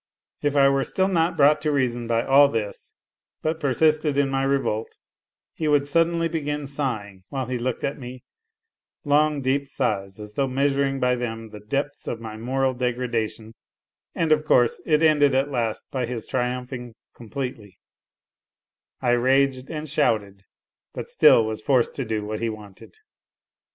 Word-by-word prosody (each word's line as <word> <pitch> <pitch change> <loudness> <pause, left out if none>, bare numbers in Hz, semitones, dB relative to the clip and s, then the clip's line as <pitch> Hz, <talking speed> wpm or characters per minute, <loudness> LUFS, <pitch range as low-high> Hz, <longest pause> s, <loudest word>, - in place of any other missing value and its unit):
If 145 0 0
I 140 -1 +6
were 135 0 +2
still 190 +6 +1
not 170 -2 +1
brought 150 +1 +5
to 150 0 0
reason 120 -4 0
by 115 0 +1
all 140 +1 +6
this, 110 -6 -5 0.5
but 160 +1 -1
persisted 150 +1 +2
in 140 -1 +2
my 135 0 0
revolt, 135 -5 -1 0.6
he 155 - -3
would 145 -1 +3
suddenly 165 +2 +2
begin 150 -3 -3
sighing 120 -9 -4
while 135 -2 -3
he 125 0 -3
looked 125 +1 -3
at 140 - -2
me, 125 -1 -9 0.8
long, 145 0 +2
deep 140 +2 0
sighs 100 -7 -2
as 105 0 -9
though 135 +4 0
measuring 135 +1 0
by 125 0 +2
them 115 -2 -5
the 105 - -9
depths 140 +7 -3
of 115 - -3
my 110 -1 -7
moral 130 +4 0
degradation, 120 -3 -3 0.6
and, 165 -2 0
of 155 0 +4
course, 120 -5 +3
it 155 -1 +3
ended 145 -3 +4
at 135 +2 +1
last 115 -4 -2
by 130 -4 -2
his 120 -3 -4
triumphing 125 -1 -3 0.2
completely: 115 -5 -7 1.3
I 120 - +3
raged 130 +2 +2
and 155 -1 -5
shouted, 105 -9 0 0.5
but - - -6
still 115 - +6
was 110 0 -4
forced 125 0 +2
to 135 - -2
do 110 -2 -2
what 105 0 -4
he 115 - -1
wanted. 105 - -11
130 Hz, 160 wpm, -24 LUFS, 115-145 Hz, 1.3 s, I